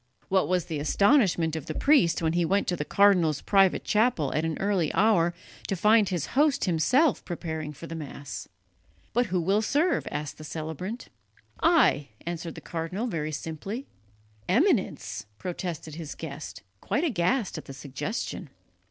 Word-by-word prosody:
What 190 Hz, -1 st, +3 dB
was 180 Hz, -2 st, +1 dB
the 160 Hz, -4 st, -4 dB
astonishment 175 Hz, -, +3 dB
of 160 Hz, -, -5 dB
the 155 Hz, -, -4 dB
priest 230 Hz, -, +3 dB
when 160 Hz, 0 st, +1 dB
he 175 Hz, 0 st, +2 dB
went 195 Hz, +4 st, +1 dB
to 180 Hz, -, +1 dB
the 150 Hz, -, -3 dB
cardinal's 175 Hz, -4 st, +4 dB
private 195 Hz, -2 st, +3 dB
chapel 210 Hz, -, +1 dB
at 155 Hz, -, 0 dB
an 160 Hz, -1 st, -2 dB
early 195 Hz, -6 st, +1 dB
hour 180 Hz, -5 st, +3 dB, 0.3 s
to 195 Hz, -, -1 dB
find 210 Hz, +2 st, +4 dB
his 175 Hz, -5 st, -1 dB
host 290 Hz, 0 st, +3 dB
himself 240 Hz, -, +2 dB
preparing 160 Hz, -3 st, -4 dB
for 150 Hz, +3 st, -10 dB
the 165 Hz, -, -7 dB
Mass. 145 Hz, -3 st, -7 dB, 0.7 s
"But 245 Hz, +1 st, +2 dB
who 185 Hz, -1 st, 0 dB
will 195 Hz, +5 st, +2 dB
serve?" 300 Hz, +10 st, +1 dB
asked 150 Hz, 0 st, -5 dB
the -, -, -8 dB
celebrant. 160 Hz, -, -5 dB, 0.5 s
"I," 320 Hz, -, +4 dB, 0.2 s
answered 170 Hz, -1 st, -5 dB
the -, -, -9 dB
cardinal 170 Hz, +6 st, -4 dB
very 155 Hz, -9 st, -2 dB
simply. 165 Hz, -, -5 dB, 0.6 s
"Eminence!" 185 Hz, -, +1 dB
protested 170 Hz, -, -5 dB
his 155 Hz, -1 st, -7 dB
guest, 150 Hz, -7 st, -8 dB, 0.2 s
quite 300 Hz, -, -1 dB
aghast 220 Hz, -, 0 dB
at -, -, -12 dB
the -, -, -9 dB
suggestion. 145 Hz, -, -5 dB
175 Hz, 160 wpm, -27 LUFS, 155-210 Hz, 0.7 s, cardinal's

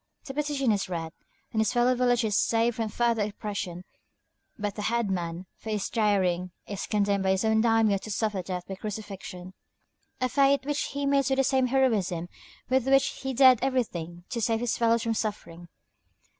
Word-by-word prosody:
The 270 Hz, -, -6 dB
petition 285 Hz, -4 st, 0 dB
is 200 Hz, -3 st, -1 dB
read, 165 Hz, -2 st, -4 dB, 0.4 s
and 220 Hz, -, +1 dB
his 220 Hz, -, +1 dB
fellow 245 Hz, +1 st, +3 dB
villagers 245 Hz, -4 st, +2 dB
saved 230 Hz, +2 st, +2 dB
from 225 Hz, -2 st, -1 dB
further 235 Hz, 0 st, +1 dB
oppression, 200 Hz, -4 st, -4 dB, 0.7 s
but 205 Hz, -1 st, -3 dB
the 210 Hz, -, -6 dB
head 225 Hz, -1 st, 0 dB
man, 175 Hz, -1 st, -3 dB
for 220 Hz, -, -9 dB
his 210 Hz, -2 st, -1 dB
daring, 190 Hz, -5 st, +1 dB, 0.2 s
is 200 Hz, -2 st, -5 dB
condemned 200 Hz, -2 st, +1 dB
by 190 Hz, -, +1 dB
his 190 Hz, +3 st, +1 dB
own 220 Hz, 0 st, +3 dB
daimiō 225 Hz, -3 st, +3 dB
to 215 Hz, -, -9 dB
suffer 210 Hz, -2 st, -1 dB
death 180 Hz, 0 st, -5 dB
by 195 Hz, -, -5 dB
crucifixion, 195 Hz, -3 st, -7 dB, 0.7 s
a 255 Hz, -, +1 dB
fate 275 Hz, +1 st, +3 dB
which 295 Hz, 0 st, -1 dB
he 280 Hz, 0 st, -3 dB
meets 275 Hz, -1 st, +2 dB
with 265 Hz, -, +1 dB
the 270 Hz, -, +4 dB
same 260 Hz, -1 st, +2 dB
heroism 210 Hz, -10 st, +1 dB, 0.4 s
with 260 Hz, -1 st, +1 dB
which 270 Hz, 0 st, +4 dB
he 265 Hz, -, -2 dB
dared 260 Hz, -2 st, +6 dB
everything 175 Hz, -10 st, -2 dB
to 235 Hz, -, -2 dB
save 225 Hz, 0 st, +1 dB
his 245 Hz, -2 st, 0 dB
fellows 230 Hz, 0 st, +2 dB
from 230 Hz, -, 0 dB
suffering. 190 Hz, -6 st, -4 dB
220 Hz, 185 wpm, -27 LUFS, 195-250 Hz, 0.7 s, dared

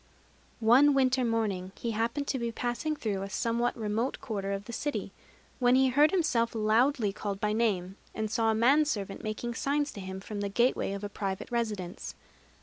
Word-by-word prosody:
One 265 Hz, +6 st, +6 dB
winter 260 Hz, -1 st, +3 dB
morning 205 Hz, -5 st, -1 dB
he 235 Hz, -, -3 dB
happened 230 Hz, +6 st, -1 dB
to 265 Hz, -, 0 dB
be 235 Hz, -1 st, -2 dB
passing 240 Hz, +7 st, -2 dB
through 205 Hz, -8 st, -2 dB
a 195 Hz, -, -5 dB
somewhat 235 Hz, +4 st, 0 dB
remote 225 Hz, +3 st, -1 dB
quarter 200 Hz, -6 st, -3 dB
of 200 Hz, +1 st, -3 dB
the 235 Hz, -, -8 dB
city, 290 Hz, +5 st, -3 dB, 0.5 s
when 245 Hz, -1 st, +4 dB
he 265 Hz, 0 st, +4 dB
heard 290 Hz, +4 st, +5 dB
himself 260 Hz, -12 st, +1 dB
loudly 220 Hz, 0 st, +2 dB
called 200 Hz, -1 st, -4 dB
by 210 Hz, +1 st, 0 dB
name, 200 Hz, -4 st, 0 dB, 0.2 s
and 215 Hz, -1 st, -2 dB
saw 225 Hz, -1 st, +2 dB
a 220 Hz, -, +2 dB
man 270 Hz, +7 st, +4 dB
servant 200 Hz, -9 st, -3 dB
making 215 Hz, +3 st, -3 dB
signs 285 Hz, +3 st, 0 dB
to -, -, -8 dB
him 190 Hz, 0 st, -6 dB
from 205 Hz, +1 st, -6 dB
the 200 Hz, -, -1 dB
gateway 235 Hz, -1 st, +1 dB
of 200 Hz, +1 st, -5 dB
a -, -, -1 dB
private 200 Hz, +2 st, -4 dB
residence. 210 Hz, -7 st, -3 dB
225 Hz, 190 wpm, -29 LUFS, 205-255 Hz, 0.5 s, One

